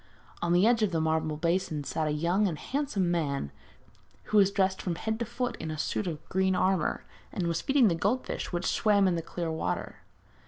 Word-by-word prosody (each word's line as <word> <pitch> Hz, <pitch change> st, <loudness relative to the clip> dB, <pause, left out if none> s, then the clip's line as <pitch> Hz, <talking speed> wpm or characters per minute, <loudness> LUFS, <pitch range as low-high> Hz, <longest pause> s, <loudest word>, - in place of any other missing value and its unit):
On 175 Hz, -, 0 dB
the 175 Hz, +3 st, +5 dB
edge 230 Hz, 0 st, +4 dB
of 195 Hz, -5 st, +1 dB
a -, -, +2 dB
marble 160 Hz, -1 st, 0 dB
basin 165 Hz, -2 st, 0 dB
sat 155 Hz, +2 st, -2 dB
a -, -, 0 dB
young 170 Hz, +7 st, +1 dB
and 165 Hz, -5 st, -3 dB
handsome 215 Hz, -, -1 dB
man, 140 Hz, -, -1 dB, 0.7 s
who 215 Hz, -, 0 dB
was 195 Hz, -2 st, +6 dB
dressed 190 Hz, -1 st, 0 dB
from 175 Hz, -3 st, -2 dB
head 220 Hz, +5 st, -3 dB
to 235 Hz, -, -1 dB
foot 240 Hz, +1 st, -3 dB
in 160 Hz, -, -5 dB
a 155 Hz, -, -4 dB
suit 185 Hz, +5 st, -2 dB
of 160 Hz, -2 st, -5 dB
green 190 Hz, 0 st, +1 dB
armour, 185 Hz, -2 st, +1 dB, 0.3 s
and 180 Hz, -, -2 dB
was 170 Hz, 0 st, -1 dB
feeding 270 Hz, -4 st, +4 dB
the 180 Hz, -, +3 dB
goldfish 205 Hz, +10 st, -1 dB
which 175 Hz, 0 st, -2 dB
swam 205 Hz, -3 st, +3 dB
in 185 Hz, -, +2 dB
the 170 Hz, -, -1 dB
clear 165 Hz, 0 st, -4 dB
water. 160 Hz, -, -3 dB
180 Hz, 210 wpm, -29 LUFS, 160-205 Hz, 0.7 s, was